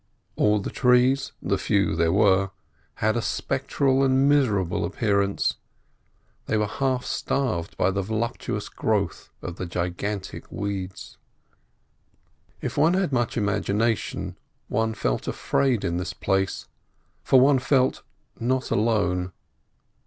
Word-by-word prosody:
All 105 0 +3
the 95 - -5
trees—the 125 +1 +2
few 100 -5 +1
there 80 0 +2
were—had 100 +2 0
a 120 - 0
spectral 135 +2 0
and 135 +1 +3
miserable 105 -12 +2
appearance. 100 +1 0 0.9
They 110 - +1
were 105 - +2
half 130 +3 -1
starved 115 -12 -2
by 95 - +2
the 100 +1 -1
voluptuous 110 +4 -3
growth - - -1
of 90 - -6
the 90 - -4
gigantic 90 +3 -4
weeds. 95 -2 -5 1.4
If - - -4
one 165 +4 +4
had 185 -7 0
much 120 -2 0
imagination 105 +1 -1 0.3
one 110 0 0
felt - - -1
afraid 125 -7 0
in 85 -1 -1
this 90 - -3
place, 95 -1 -1 0.6
for 130 - +5
one 135 +1 +5
felt 130 0 +2 0.4
not 130 +2 -1
alone. 100 -5 +1
105 Hz, 115 wpm, -25 LUFS, 95-130 Hz, 1.4 s, for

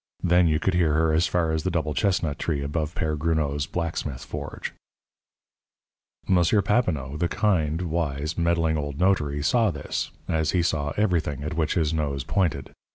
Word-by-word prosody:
Then 90 0 +4
you 80 -1 +2
could 95 +4 0
hear 85 -4 +2
her 80 0 +2
as 80 +3 +3
far 85 -2 +1
as 80 0 0
the 95 - -1
double 80 -4 -1
chestnut 80 -3 0
tree 75 -4 -1
above 75 +2 -2
Père 75 -1 0
Gruneau's 75 -3 0
blacksmith 80 -6 -3
forge. - - -6 1.5
M. 95 - +4 0.3
Papineau, 75 - 0
the 85 +2 +1
kind, 85 -5 +1
wise, 80 -2 -2
meddling 85 -2 +1
old 70 -1 -4
notary, 75 -7 +1
saw 115 +6 +3
this, - - -3 0.2
as 80 -1 0
he 90 -2 +2
saw 75 -4 0
everything 80 -9 0
at 75 +1 -3
which 80 -1 0
his 80 -3 +1
nose 70 -4 -1
pointed. 80 -6 -1
80 Hz, 165 wpm, -25 LUFS, 75-85 Hz, 1.5 s, Then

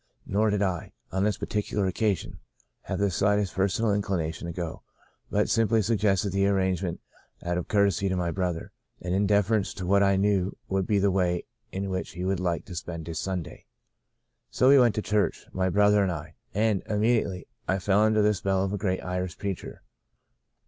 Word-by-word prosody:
Nor 105 +2 +1
did 105 -1 +1
I, 90 -4 -2 0.2
on 95 +1 0
this 105 0 +1
particular 105 -1 -1
occasion, 100 +1 -1 0.5
have - - -3
the 100 -1 +1
slightest 100 +1 +1
personal 100 +3 +1
inclination 85 -5 -2
to - - -3
go, 85 -1 -5 0.5
but - - +1
simply 115 -1 +2
sug 110 +1 +1
gested 100 -1 +2
the 100 +1 +2
arrangement 95 -3 0 0.4
out 85 +1 -1
of 90 - -6
courtesy 100 -2 +2
to 95 - 0
my 90 -2 -1
brother, 90 -2 -2 0.3
and 90 +1 -3
in 100 +2 +2
deference 105 0 +2
to 95 - -5
what 100 +2 +4
I 100 -1 +4
knew 100 -1 +1
would 95 -1 -1
be 105 - +2
the 100 0 +3
way 90 -2 0 0.3
in 95 0 -3
which 95 0 -3
he 90 +2 -4
would 95 -1 0
like 90 -2 -1
to 90 - -9
spend 85 -1 -5
his 80 -1 -4
Sunday. 95 -4 -5 0.8
So 130 - +3
we 140 0 +8
went 120 -4 +4
to 110 - -1
church, 105 0 0
my 95 0 +1
brother 105 +2 +4
and 95 -2 +1
I, 80 -1 -6 0.2
and, 105 -1 +1
immediately, 105 -3 +1 0.2
I 95 - +2
fell 95 +1 +2
under 110 0 +4
the 105 0 +4
spell 95 0 0
of 95 +1 -2
a 105 - -2
great 95 -2 -1
Irish 90 -1 -3
preacher. 100 -3 -5
95 Hz, 195 wpm, -27 LUFS, 90-105 Hz, 0.8 s, we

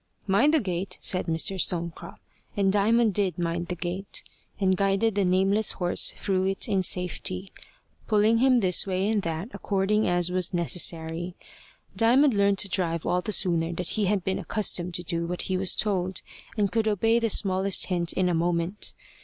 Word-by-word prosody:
"Mind 205 +9 +3
the - - +4
gate," 185 -4 -4
said 185 0 -1
Mr. 170 +3 +2
Stonecrop; 170 -2 -2 0.4
and 195 -1 +2
Diamond 220 +2 +2
did 190 -4 0
mind 170 0 -3
the 180 - -4
gate, 180 +3 -5 0.4
and 190 -2 +2
guided 195 +3 +1
the 200 0 0
nameless 195 +3 +2
horse 175 -1 +2
through 190 -1 -1
it 195 0 0
in 195 -3 +1
safety, 185 +1 -1 0.6
pulling 215 +1 +3
him 255 -1 +3
this 185 0 +3
way 190 +1 -1
and 215 -1 0
that 165 +4 -4
according 205 +2 0
as 175 0 +1
was 180 0 0
necessary. 170 0 -1 0.6
Diamond 250 +4 +4
learned 200 -1 +2
to 200 - 0
drive 170 -4 -2
all 180 - 0
the 215 - -4
sooner 170 -4 +2
that 180 +1 -4
he 215 -2 -1
had 195 -1 0
been 190 +1 -2
accustomed 180 -2 -1
to 175 - -3
do 170 0 -3
what 180 +1 -2
he 190 - -2
was 185 0 +2
told, 190 -3 -1 0.3
and 205 -2 0
could 225 -1 0
obey 225 +3 +2
the 230 -1 -1
smallest 195 -1 +2
hint 175 -2 -1
in 185 -1 0
a 180 - 0
moment. 170 +3 -2
190 Hz, 180 wpm, -26 LUFS, 175-205 Hz, 0.6 s, the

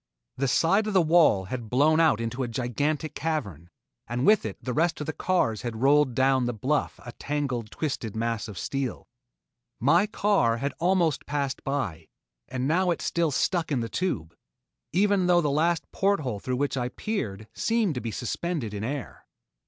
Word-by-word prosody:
The 135 +1 0
side 195 +10 +3
of 210 - -2
the 185 - +6
wall 155 - +4
had 115 +2 -5
blown 150 +6 +4
out 160 -9 +4
into 115 +3 -3
a 125 - -1
gigantic 140 +6 -2
cavern, 120 - -3 0.4
and 120 +3 -1
with 210 - +4
it 100 - -7
the 125 - -4
rest 165 +4 +1
of 150 - -3
the 155 - -3
cars 145 - 0
had 120 0 -4
rolled 140 -2 +4
down 130 -1 +3
the 120 -1 -2
bluff 135 +8 -1
a 120 - -6
tangled, 130 -4 -3
twisted 120 -8 -4
mass 115 -1 -2
of 105 -3 -9
steel. 135 +7 -3 0.7
My 170 - +4
car 200 - +2
had 140 +4 -2
almost 175 -4 +1
passed 140 -2 -2
by, 95 - -3 0.4
and 130 +1 -2
now 180 +4 +2
it 170 - 0
still 170 -1 0
stuck 165 +4 0
in 130 -4 +1
the 115 - -3
tube, 85 - -2 0.6
even 195 +1 +2
though 175 -1 +5
the 150 -4 +1
last 165 +4 +1
port 200 -3 +1
hole 125 -7 -3
through 125 +4 -2
which 140 0 0
I 125 -2 -1
peered 110 - -4
seemed 225 -6 +1
to 125 - -4
be 115 - -4
suspended 120 - -3
in 100 0 -4
air. 135 +2 -5
140 Hz, 185 wpm, -26 LUFS, 115-165 Hz, 0.7 s, the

